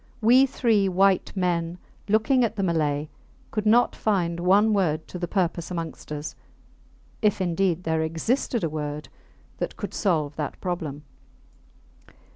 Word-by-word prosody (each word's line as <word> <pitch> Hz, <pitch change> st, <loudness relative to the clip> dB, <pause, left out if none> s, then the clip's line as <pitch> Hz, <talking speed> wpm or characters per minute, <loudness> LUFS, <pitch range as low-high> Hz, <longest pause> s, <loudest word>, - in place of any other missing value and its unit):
We 250 Hz, +5 st, +6 dB
three 215 Hz, -6 st, +2 dB
white 190 Hz, +1 st, +3 dB
men, 175 Hz, -2 st, -1 dB, 0.3 s
looking 220 Hz, +5 st, +3 dB
at 225 Hz, -1 st, 0 dB
the 200 Hz, -, -1 dB
Malay, 155 Hz, -4 st, 0 dB, 0.4 s
could 215 Hz, -1 st, -1 dB
not 235 Hz, +3 st, +4 dB
find 175 Hz, -5 st, 0 dB
one 200 Hz, +5 st, +4 dB
word 160 Hz, -6 st, 0 dB
to 180 Hz, -, -6 dB
the 175 Hz, -, -2 dB
purpose 175 Hz, -3 st, -1 dB
amongst 165 Hz, -4 st, -6 dB
us 150 Hz, 0 st, -4 dB, 0.9 s
if 210 Hz, -3 st, +2 dB
indeed 180 Hz, -1 st, 0 dB
there 160 Hz, -1 st, 0 dB
existed 210 Hz, -, -1 dB
a -, -, +2 dB
word 150 Hz, -1 st, -4 dB, 0.5 s
that -, -, -3 dB
could -, -, -5 dB
solve 155 Hz, -8 st, 0 dB
that 150 Hz, -3 st, -4 dB
problem. 160 Hz, -6 st, -4 dB
180 Hz, 140 wpm, -25 LUFS, 160-210 Hz, 0.9 s, We